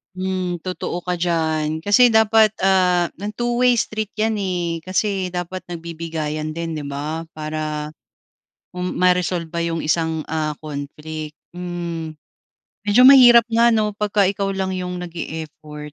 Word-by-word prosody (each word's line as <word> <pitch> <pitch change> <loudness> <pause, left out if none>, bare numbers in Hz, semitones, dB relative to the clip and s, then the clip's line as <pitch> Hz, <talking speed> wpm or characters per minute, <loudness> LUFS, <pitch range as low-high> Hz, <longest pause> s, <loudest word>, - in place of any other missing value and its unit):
Hmm, 185 -2 -2
totoo 180 -1 -4
ka 180 0 -2
diyan. 160 -2 -1
Kasi 225 +7 +5
dapat 220 -1 +5
ah, 180 -2 +3
ng 205 +4 -5
two-way 240 +2 +2
street 215 -1 -3
'yan, 220 0 0
eh, 180 -4 -2
kasi 190 -1 -1
dapat 180 +1 -5
nagbibigayan 160 -2 -5
din 165 0 -4
'di 150 - -5
ba 150 +3 -4
para 155 -1 -4 0.9
m 180 0 -2
ma-resolba 180 -2 +1
yung 165 -1 -2
isang, 160 0 0
ah, 155 -1 -1
conflict, 150 +1 -7 0.2
hmm. 170 -2 -5 0.8
Medyo 215 +5 +6
mahirap 240 -4 +8
nga 235 +1 +5
'no 215 -1 +1
'pagka 210 -1 +2
ikaw 195 0 -1
lang 190 -1 -2
yung 180 0 -4
nag-e-effort 155 -3 -7
175 Hz, 130 wpm, -21 LUFS, 160-195 Hz, 0.9 s, mahirap